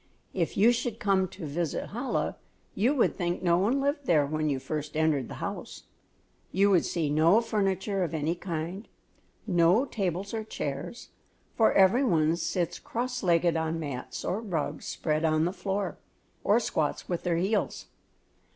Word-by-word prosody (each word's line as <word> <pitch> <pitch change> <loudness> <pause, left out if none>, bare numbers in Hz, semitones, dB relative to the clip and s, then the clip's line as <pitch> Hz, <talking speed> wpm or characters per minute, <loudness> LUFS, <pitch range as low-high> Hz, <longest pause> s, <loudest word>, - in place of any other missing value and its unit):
If 170 -4 -1
you 220 +4 +6
should 235 -1 -2
come 195 -5 +2
to 185 -2 -9
visit 155 +2 -3
Chola, 245 +4 -1 0.4
you 240 +9 +2
would 250 - +2
think 175 -1 -2
no 170 -1 +3
one 230 +9 +2
lived 285 +1 -1
there 155 -4 +4
when 155 +1 -1
you 140 - 0
first 150 +3 -4
entered 155 -5 +2
the - - -8
house. - - -6 0.7
You 200 +2 +3
would 180 -4 +4
see 165 -4 -1
no 160 +8 +5
furniture 195 -3 0
of 165 -2 -3
any 155 +2 0
kind, 175 +3 -5 0.6
no 180 +5 +4
tables 195 - -3
or 220 -1 -2
chairs, 145 - -5 0.5
for 225 - +4
every 195 +8 +5
one 165 - +3
sits 175 0 -2
cross 245 +1 -3
legged 170 -2 +3
on 160 0 -1
mats 140 -5 -5
or 200 +5 -1
rugs 175 -9 -3
spread 155 0 -1
on 155 0 +3
the 180 - -1
floor, 195 -1 -3 0.4
or 210 +3 +4
squats 155 -9 -1
on 175 - 0
their 175 -2 0
heels. 200 +5 -1
180 Hz, 165 wpm, -28 LUFS, 160-210 Hz, 0.7 s, you